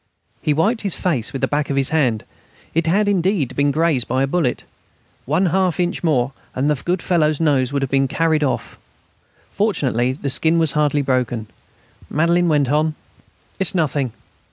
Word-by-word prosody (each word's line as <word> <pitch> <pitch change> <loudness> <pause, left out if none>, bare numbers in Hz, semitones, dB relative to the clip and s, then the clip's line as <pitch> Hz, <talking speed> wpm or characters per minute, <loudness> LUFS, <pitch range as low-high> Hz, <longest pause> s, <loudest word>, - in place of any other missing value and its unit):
He 155 - 0
wiped 205 - +1
his 200 -4 -1
face 140 -11 -1
with 135 - -6
the - - +3
back 145 0 -1
of 140 - -1
his 135 -1 +2
hand. 130 -9 +1 0.5
It 165 0 0
had 205 +5 +2
indeed 185 - 0
been 145 0 +2
grazed 150 -4 +1
by 130 +2 0
a - - +1
bullet. 140 -4 -1 0.6
One 160 +7 +2
half 185 -3 +1
inch 175 0 -1
more, 135 -6 +1 0.2
and 130 +2 0
the 145 - -2
good 180 +1 -1
fellow's 155 -5 +1
nose 140 -5 +2
would 140 -1 -1
have 135 - -3
been 135 0 +2
carried 160 +2 +1
off. 140 - -3 0.7
Fortunately 130 - 0
the 140 0 -3
skin 160 +4 +3
was 160 -3 +3
hardly 150 -1 +1
broken. 125 -4 -1 0.6
Madelaine 170 +3 +2
went 145 -4 +2
on: 155 +1 +1 0.6
"It's 190 -1 +1
nothing 145 -6 0
150 Hz, 180 wpm, -20 LUFS, 135-170 Hz, 0.7 s, the